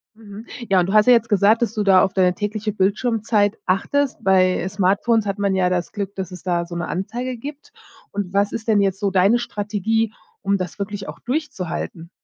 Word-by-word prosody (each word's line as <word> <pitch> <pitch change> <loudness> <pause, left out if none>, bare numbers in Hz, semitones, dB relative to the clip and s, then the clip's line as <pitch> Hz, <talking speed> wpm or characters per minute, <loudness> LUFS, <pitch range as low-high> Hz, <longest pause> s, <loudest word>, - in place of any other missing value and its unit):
Mhm, 215 0 -11 0.2
ja, 190 -2 +4
und 175 - +1
du 195 - -3
hast 215 +1 +5
ja 250 - +7
jetzt 230 -1 +3
gesagt, 210 +3 +3
dass 230 - +1
du 210 -1 -1
da 190 -2 +6
auf 190 -1 +1
deine 185 -2 +2
tägliche 210 +1 -3
Bildschirmzeit 210 +1 +1
achtest. 275 +9 0
Bei 185 -1 +3
Smartphones 200 +3 +1
hat 200 +1 -2
man 200 -1 +1
ja 185 -1 +2
das 180 -1 -2
Glück, 200 -2 -4
dass 185 -1 -5
es 180 - -9
da 175 -2 -1
so 170 - -8
'ne 175 - -3
Anzeige 240 +8 -4
gibt 285 +5 -9 0.4
und 200 -2 -4
was 200 +1 +2
ist 225 - -5
denn 215 -2 +3
jetzt 195 -1 +1
so 200 -1 0
deine 195 +5 +4
Strategie, 220 0 -1 0.3
um 200 -1 +1
das 180 +2 -5
wirklich 200 0 -5
auch - - -9
durchzuhalten? 185 - -4
200 Hz, 210 wpm, -21 LUFS, 185-220 Hz, 0.4 s, ja